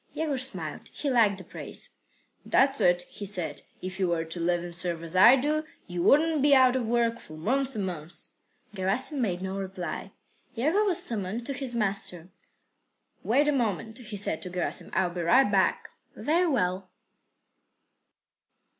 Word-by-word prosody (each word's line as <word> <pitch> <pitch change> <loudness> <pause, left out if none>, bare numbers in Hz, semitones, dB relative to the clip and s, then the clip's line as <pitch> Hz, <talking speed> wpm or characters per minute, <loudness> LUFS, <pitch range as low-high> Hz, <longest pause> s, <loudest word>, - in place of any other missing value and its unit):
Yegor 300 -4 -1
smiled. 185 - -3
He 285 - -3
liked 220 -5 +4
the 190 - -9
praise. - - -7 0.5
"That's 275 +1 +3
it," 175 0 +3
he 205 - -10
said. 180 -7 -2 0.2
"If 185 +1 -5
you 190 - +2
were 170 -1 -1
to 165 +2 -4
live 175 +1 0
and 175 -1 -7
serve 170 -1 +3
as 165 +2 -5
I 235 +8 +8
do, 300 +4 0 0.2
you 175 -1 -4
wouldn't 310 - +4
be 285 0 +6
out 260 -1 +5
of 250 -3 -1
work 235 0 +1
for 155 - -12
months 260 +9 0
and 205 -3 -1
months." 170 -2 -4 0.4
Gerasim 210 +9 -1
made 185 -5 -1
no 190 +1 -3
reply. 190 -2 -5 0.4
Yegor 315 - +2
was 370 -5 +1
summoned 220 +1 -4
to 275 - -3
his 255 -2 -5
master. 195 -5 -2 0.9
"Wait 275 +6 +2
a - - +4
moment," 225 -3 -2
he 215 -4 -7
said 190 -5 -1
to 180 - -6
Gerasim. 180 -1 -3
"I'll 180 -1 +1
be 175 0 -4
right 205 +6 +4
back." 195 -2 +1 0.3
"Very 340 +4 +1
well." 185 - -1
205 Hz, 170 wpm, -27 LUFS, 180-260 Hz, 0.9 s, I